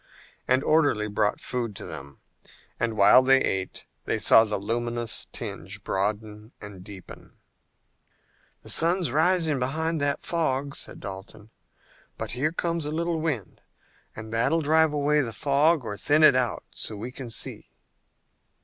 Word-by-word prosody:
An 130 +2 +2
orderly 145 -9 +2
brought 105 0 0
food 120 -4 -4
to - - -7
them, 70 0 -9 0.6
and 115 -2 -1
while 105 +5 +7
they 135 +1 +5
ate 95 -6 -3 0.2
they - - 0
saw 110 - +6
the 105 -2 -2
luminous 120 +2 -2
tinge - - -6
broaden 105 +2 -3
and 100 -3 -11
deepen. 100 -2 -12 1.3
"The - - -3
sun's 170 -2 +3
rising 160 -1 +2
behind 160 +5 -1
that 145 0 -1
fog," 140 -4 -1
said - - -6
Dalton, 100 +3 -9 0.7
"but - - -5
here 135 +6 -1
comes 170 -2 -2
a - - -3
little 165 +1 -1
wind 140 - -4 0.5
that 115 +4 -1
will 165 0 +2
drive 160 +1 +3
away 150 0 +2
the 115 -4 -3
fog 145 +3 +2
or 105 - -4
thin 150 +7 +2
it 155 - +7
out 125 -2 0
so 110 - -4
we 115 +5 -6
can 130 -1 -8
see." 115 - -4
130 Hz, 150 wpm, -26 LUFS, 110-155 Hz, 1.3 s, while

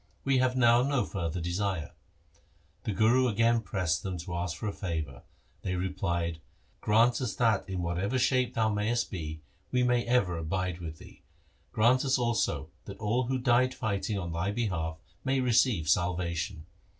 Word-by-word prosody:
We 135 -1 +2
have 130 0 +1
now 120 -1 +5
no 140 -1 +1
further 85 -3 -3
desire.' 90 -1 -2 0.9
The 110 - 0
Guru 115 +6 +4
again 115 +1 +2
pressed 90 -8 -1
them 95 -2 -4
to 85 +1 -6
ask 85 -2 -2
for 110 - -4
a 100 - -2
favour. 80 -8 -4 0.4
They 95 -1 -2
replied, 85 -3 -2 0.2
' - - -37
Grant 115 +4 +3
us 125 -4 -2
that 110 -5 +1
in 90 -2 -2
whatever 90 +8 -1
shape 130 0 +2
thou 110 -1 +2
mayest 110 +3 0
be, 80 -5 -5 0.3
we 125 0 +2
may 120 -1 +2
ever 105 -9 +2
abide 90 +2 -2
with 80 -2 -7
thee. - - -15 0.5
Grant 120 +4 +3
us 135 -1 +2
also 120 -2 0
that - - -8
all 115 +4 0
who 130 +1 0
die 125 0 +3
fighting 105 -4 -2
on 85 -3 -4
thy 85 +4 -1
behalf 95 -8 -2 0.3
may 135 0 +1
receive 120 - +2
salvation.' 85 0 0
100 Hz, 170 wpm, -29 LUFS, 85-120 Hz, 0.9 s, now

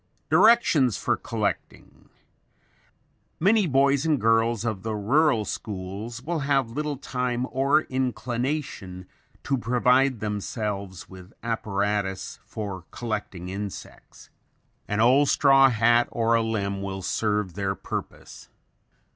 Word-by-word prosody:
Directions 160 - +5
for - - 0
Collecting - - -5 1.3
Many 200 +2 +3
boys 140 0 +3
and 155 -4 +1
girls 115 0 +2
of 110 -5 -2
the 110 +1 -3
rural 115 +2 +2
schools 105 +5 -6
will 165 +2 -2
have 135 -4 +1
little 150 +2 -3
time 125 -2 -2
or 140 +4 +3
inclination 125 -6 -3 0.4
to 135 -2 0
provide 125 +2 +2
themselves 105 -3 -4
with 95 +1 -13
apparatus 105 -3 -2
for 95 -5 -6
collecting 105 -6 -5
insects. 100 0 -8 0.6
An 105 - -2
old 130 +5 +5
straw 135 -1 +5
hat 120 +1 +3
or 115 0 +1
a 115 - +4
limb 100 -3 -2
will 95 -1 -5
serve 105 -2 -1
their 100 +1 -2
purpose. - - -7
115 Hz, 115 wpm, -25 LUFS, 100-135 Hz, 1.3 s, Directions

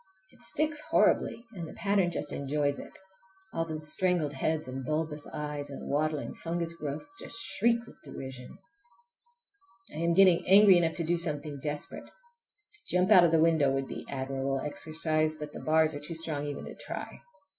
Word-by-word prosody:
It - - -22
sticks 305 -1 0
horribly 235 - +2
and 170 -5 -6
the - - -11
pattern 200 -3 +2
just 175 - -4
enjoys 145 0 -1
it! - - -10 0.6
All 165 - -1
those 155 -1 +1
strangled 175 -6 +1
heads 155 +3 -1
and 130 +1 -5
bulbous 155 +1 -2
eyes 150 -1 -5
and 140 - -8
waddling 150 +1 -1
fungus 170 0 -3
growths 155 - -5
just 230 - +2
shriek 235 +1 +1
with 240 - -17
derision! 130 -2 -9 1.4
I 155 - -6
am 170 +1 +2
getting 185 -2 +6
angry 195 -1 +8
enough 165 -2 0
to 170 - 0
do 170 +2 +1
something 150 -3 -3
desperate. 145 +1 -4
To 475 -4 -21
jump 185 +3 +2
out 180 -4 +8
of - - +4
the 165 -1 +4
window 160 -4 +3
would 135 0 -1
be - - -6
admirable 135 0 -2
exercise, 155 +1 0
but 150 -1 -8
the - - -7
bars 155 0 +3
are 145 - -5
too 150 +3 -7
strong 155 -3 -2
even 145 -1 -5
to - - -8
try. - - -7
155 Hz, 175 wpm, -29 LUFS, 145-175 Hz, 1.4 s, angry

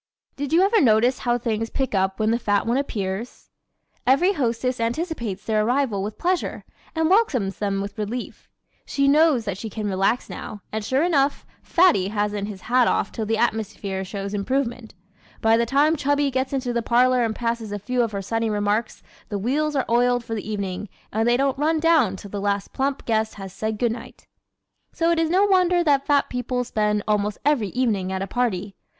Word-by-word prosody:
Did 285 -1 -4
you 340 +3 +5
ever 425 +3 +4
notice 240 0 +3
how 240 -1 +1
things 225 -1 -2
pick 265 -3 -2
up 190 -1 0
when 215 0 +2
the 235 - +1
fat 205 -3 +1
ones 240 +4 +1
appear? 200 -6 -2 0.8
Every 345 +10 +4
hostess 250 - -1
anticipates 230 - -3
their 215 -1 +1
arrival 240 -3 +1
with 210 +2 -5
pleasure 360 0 -1 0.3
and 320 0 +2
welcomes 295 - +2
them 200 -1 -1
with 200 +2 -6
relief. 225 +4 -5 0.3
She 275 0 0
knows 290 -4 +4
that 200 -2 -3
she 225 - -5
can 215 0 -5
relax 195 +5 0
now, 210 - -8
and 220 0 -3
sure 260 +7 +1
enough, 290 -5 +1 0.2
Fatty 335 - +3
hasn't 205 -1 -2
his 200 -3 -8
hat 245 0 +3
off - - 0
till 220 -2 -4
the 225 0 +1
atmosphere 210 -4 -2
shows 195 +1 -5
improvement. 240 +1 -2 0.4
By 225 0 +4
the 235 0 +1
time 290 +5 +3
Chubby 285 -1 +1
gets 260 +1 -1
into 260 -3 -2
the 235 - 0
parlor 250 +2 +3
and 220 -1 -1
passes 230 -2 -2
a 205 - -2
few 250 +5 -1
of 230 -2 0
her 200 -1 -4
sunny 225 +3 -1
remarks 210 +2 -1 0.3
the 205 - -2
wheels 290 +8 0
are 270 - +1
oiled 245 +1 +2
for 225 - -5
the 215 -1 -4
evening 200 -1 -4 0.2
and 225 +2 +2
they 240 - +4
don't 275 0 0
run 315 +2 +2
down 310 - +3
till 195 +1 -10
the 205 - -4
last 200 0 -1
plump 275 +1 -2
guest 220 -1 0
has 195 -2 -8
said 220 0 -3
good 235 +1 +1
night. 230 0 -9 0.7
¶ - - -27
So 335 0 +2
it 335 - +2
is 325 -1 +1
no 375 +4 +4
wonder 365 -3 +3
that 280 -4 +2
fat 290 -2 +3
people 250 0 -2
spend 210 -3 0
almost 210 -1 0
every 285 -8 +2
evening 210 -6 0
at 190 0 -2
a - - -2
party. 205 -3 -2
235 Hz, 205 wpm, -23 LUFS, 210-275 Hz, 0.8 s, you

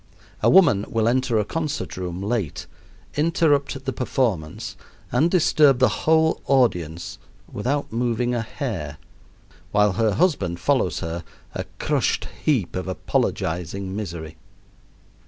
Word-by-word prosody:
A - - +4
woman 145 - +6
will 115 -1 +1
enter 125 -1 +2
a 105 - +1
concert 155 +1 -3
room 90 0 -4
late, 105 -7 -2 0.5
interrupt 145 -3 +1
the 135 - -1
performance, 115 -11 -2 0.4
and 165 - +3
disturb 155 -6 +4
the 130 -1 +4 0.2
whole 160 0 +4
audience 90 - +1 0.3
without 140 +7 -2
moving 120 +1 0
a 120 - 0
hair, 100 - -5 0.7
while 105 -1 +4
her 110 +2 +1
husband 100 - +1
follows 125 - +1
her, 80 +1 -4 0.3
a - - -4
crushed - - 0 0.2
heap 125 - +1
of 90 0 -3
apologizing 95 +1 -2
misery. 85 -6 -6
115 Hz, 120 wpm, -23 LUFS, 90-140 Hz, 0.7 s, woman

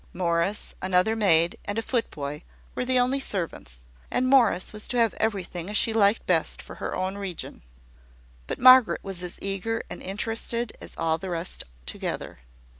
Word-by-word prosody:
Morris, 175 +3 -1
another 185 +4 +2
maid, 170 -6 +3
and 205 +1 -3
a - - +1
foot 235 0 -1
boy, 145 0 -6 0.3
were - - -2
the 255 0 +2
only 250 +2 +2
servants; 165 - -4 0.3
and 255 - +1
Morris 245 -9 +3
was 215 0 -2
to 250 - -2
have 230 -3 +3
everything 185 -4 -2
as 210 - +1
she 225 - +3
liked 210 0 +3
best 165 -3 +2
for - - -10
her - - -4
own 190 +2 -3
region. 190 -4 -6 0.9
But - - -3
Margaret 255 -1 +7
was 195 -3 -3
as 180 -1 -5
eager 200 +4 -2
and - - -6
interested 225 +3 -2
as - - -10
all 160 0 0
the 190 - -6
rest 170 +1 -3 0.2
together. - - -4
200 Hz, 175 wpm, -26 LUFS, 175-225 Hz, 0.9 s, Margaret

